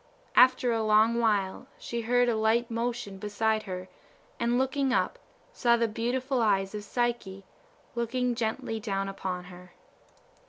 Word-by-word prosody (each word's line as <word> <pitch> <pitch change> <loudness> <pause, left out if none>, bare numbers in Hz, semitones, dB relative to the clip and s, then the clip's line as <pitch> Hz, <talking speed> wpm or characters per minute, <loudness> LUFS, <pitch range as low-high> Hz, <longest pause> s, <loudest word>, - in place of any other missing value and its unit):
After 255 -1 +5
a 225 -1 +1
long 220 +2 +4
while 210 0 0
she 235 0 -4
heard 245 +2 +2
a 235 - +2
light 225 +2 +1
motion 230 -4 -3
beside 215 +1 0
her, 185 0 -5 0.5
and 235 +1 +1
looking 265 +1 +1
up, - - 0 0.3
saw 235 -1 +3
the 230 0 +2
beautiful 245 +4 -1
eyes 195 -3 +1
of 210 -1 -5
Psyche, 210 -4 -2 0.5
looking 245 +1 -1
gently 225 -1 -2
down 195 -2 -2
upon 185 -2 -4
her. 180 0 -13
230 Hz, 145 wpm, -28 LUFS, 205-240 Hz, 0.5 s, After